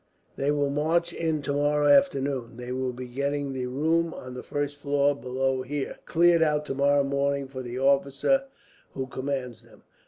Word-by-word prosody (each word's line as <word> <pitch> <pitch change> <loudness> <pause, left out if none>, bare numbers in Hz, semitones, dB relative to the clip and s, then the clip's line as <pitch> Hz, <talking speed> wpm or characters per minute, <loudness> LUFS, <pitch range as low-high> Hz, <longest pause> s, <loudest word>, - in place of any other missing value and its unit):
They 140 - -1
will 145 -1 +1
march 160 +4 +1
in 160 -3 -1
tomorrow 145 +1 +1
afternoon. 140 -8 +2
They 125 0 -6
will 130 0 -1
be 125 +1 -7
getting 140 +2 -2
the 130 -1 -3
room 160 +6 0
on 130 0 -8
the 125 - -6
first 145 0 -3
floor, 145 0 +1
below 130 0 -1
here, 140 +2 -4
cleared 170 0 +4
out 150 -1 +2
tomorrow 140 +1 +2
morning 140 0 0
for 130 -1 -7
the 120 0 -6
officer 140 - +2 0.5
who 130 - -2
commands 130 -2 -4
them." - - -20
140 Hz, 165 wpm, -26 LUFS, 130-145 Hz, 0.5 s, cleared